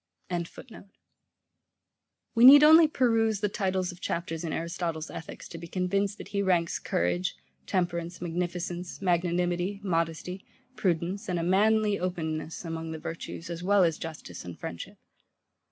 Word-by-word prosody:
] 175 -1 -6 1.9
We 230 - +3
need 285 +3 +11
only 315 +1 +8
peruse 225 -7 +2
the 210 - +1
titles 190 -2 -1
of 175 0 -14
chapters 165 -1 -3
in 165 - -3
Aristotle's 165 -1 -3
Ethics 165 - -8
to 165 - -8
be 170 - -8
convinced 195 +3 -1
that - - -9
he 200 -1 -1
ranks 175 -4 +1
courage, 90 +1 -1 0.3
temperance, 175 -1 -1
magnificence, 175 +1 -4
magnanimity, 175 +1 0
modesty, 170 +1 -2 0.3
prudence, 185 +3 -1
and 180 - 0
a 165 - -1
manly 210 +3 +3
openness, 165 -2 -3
among 165 0 -4
the - - -5
virtues, 165 +1 -6
as 170 0 -5
well 195 +1 +4
as 165 -2 +1
justice 160 - -7
and 90 -2 -8
friendship. 85 0 -7
175 Hz, 140 wpm, -28 LUFS, 165-195 Hz, 1.9 s, need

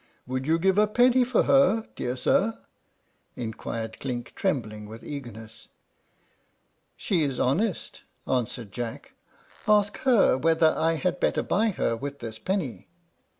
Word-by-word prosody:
"Would 130 +2 -3
you 165 +1 +3
give 190 +3 +2
a 210 - +5
penny 245 +3 +4
for 245 -1 +2
her, 250 -5 +3
dear 125 0 -3
sir?" 200 - +1 0.8
inquired 110 -1 -5
Clink, 125 -3 -5
trembling 110 - -2
with 110 +2 -10
eagerness. 115 -6 -8 1.3
"She 180 -5 0
is 135 -4 -1
honest," 180 - -1 0.3
answered 120 -4 -2
Jack; 115 +3 -6 0.5
"ask 210 -1 +3
her 235 - +4
whether 160 +1 +3
I 165 +1 +2
had 180 +3 -1
better - - +1
buy 220 +3 +1
her 150 - -1
with 140 +4 -6
this 115 -4 -7
penny." 135 - -3
140 Hz, 135 wpm, -26 LUFS, -, 1.3 s, a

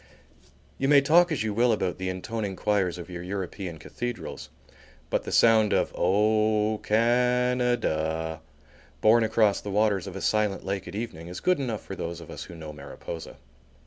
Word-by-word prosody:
You 135 - +1
may 145 0 +7
talk 170 +5 +5
as 145 -8 0
you 110 -2 -1
will 120 +3 +3
about 95 -5 -1
the 95 0 -2
intoning 100 +2 -4
choirs 95 -3 0
of 85 - -8
your 90 -1 -7
European 95 -1 -5
cathedrals, 120 +8 -6 0.6
but - - 0
the - - -5
sound 110 -2 +5
of - - +1
"O 105 +2 +2
Can 125 +3 +2
a 125 0 +2
da," 80 -4 -2 0.6
borne 115 +2 +5
across 110 -2 +2
the 105 - -6
waters 100 -1 +1
of 95 - -7
a 95 - -5
silent 105 -2 0
lake 95 -1 -3
at 90 - -7
evening 105 -7 -5
is 90 +1 -6
good 180 -3 +2
enough 120 -6 -3
for 95 - -6
those 85 -1 -5
of 85 - -11
us - - -7
who - - -11
know 80 -2 -8
Mariposa. 75 +3 -8
105 Hz, 180 wpm, -27 LUFS, 90-115 Hz, 0.6 s, may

